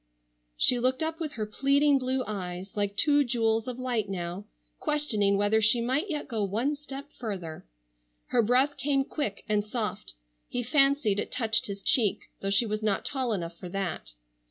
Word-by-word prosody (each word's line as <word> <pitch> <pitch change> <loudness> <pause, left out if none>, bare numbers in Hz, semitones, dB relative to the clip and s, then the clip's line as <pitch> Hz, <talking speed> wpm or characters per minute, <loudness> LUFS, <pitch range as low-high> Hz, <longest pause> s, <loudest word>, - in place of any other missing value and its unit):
She 245 - +5
looked 260 +4 +1
up 320 +1 -2
with 310 -3 -4
her 215 -2 -3
pleading 275 +5 +3
blue 255 0 0
eyes, 190 0 -5
like 205 -1 -1
two 290 +2 +4
jewels 225 -2 +1
of 250 -1 -4
light 245 -5 -2
now, 180 +1 -4 0.3
questioning 240 - +1
whether 205 +2 +2
she 215 +3 +4
might 260 - 0
yet 300 -3 -3
go 225 -4 -2
one 230 +9 0
step 280 0 -9
further. 185 - -6 0.6
Her - - +3
breath 255 +6 +2
came 275 -1 +1
quick 245 -10 -4
and 210 -1 +1
soft, 210 - -4 0.3
he 245 - -2
fancied 275 -5 +3
it - - -4
touched 225 -2 +4
his 200 -1 -7
cheek, 220 -6 +1
though 195 - -3
she 200 +4 +4
was 215 0 -3
not 210 -2 0
tall 260 -4 -1
enough 170 -5 -3
for 180 - -7
that. 175 - -4
225 Hz, 180 wpm, -28 LUFS, 200-275 Hz, 0.6 s, She